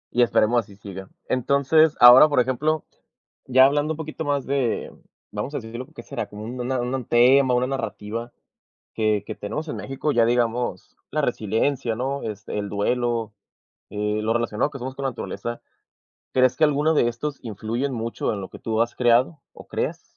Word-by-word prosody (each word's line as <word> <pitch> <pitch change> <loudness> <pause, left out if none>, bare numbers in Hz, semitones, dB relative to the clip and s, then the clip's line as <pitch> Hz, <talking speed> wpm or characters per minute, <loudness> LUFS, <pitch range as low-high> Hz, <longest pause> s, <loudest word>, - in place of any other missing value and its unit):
Y 125 - +4
esperemos 120 0 +3
así 100 -3 -8
siga. 95 -1 -9 0.2
Entonces, 140 +4 +3
ahora, 125 +5 +9
por 145 - +2
ejemplo, 140 +5 0 0.6
ya 130 +1 +6
hablando 145 +3 +1
un - - -9
poquito 160 0 -5
más 140 -2 0
de 135 -4 -1 0.4
vamos 145 - -4
a - - 0
decirlo, 115 +2 -8
¿qué - - -9
será? - - -5
Como 105 +1 -9
un 125 +2 -5
una 130 +1 -1
un 125 0 -3
tema, 125 +2 +5
una 125 +1 +2
narrativa 115 -2 -4 0.6
que 110 -2 +1
que - - -6
tenemos 150 +10 -5
en - - -4
México, 135 +3 -3
ya 115 -1 +4
digamos 120 -5 -1 0.2
la - - 0
resiliencia, 115 +3 0
¿no? 135 +3 -2
Este, 105 -1 -5
el 100 -1 -3
duelo, 115 +1 -1 0.6
eh, 105 +1 -2
lo 110 +1 0
relacionado 120 +3 0
que 135 - -7
somos 130 +2 -5
con 140 - -5
la - - +2
naturaleza, 120 0 -5 0.7
¿crees 130 -1 +3
que 160 - +5
alguno 150 +2 +2
de 120 - +3
estos 140 +5 -4
influyen 115 +5 -3
mucho 115 -1 -2
en 100 - -5
lo 95 - -7
que - - -12
tú 110 0 -1
has 120 0 0
creado 125 +6 +3
o - - -14
creas? - - -3
120 Hz, 185 wpm, -23 LUFS, 110-135 Hz, 0.7 s, ahora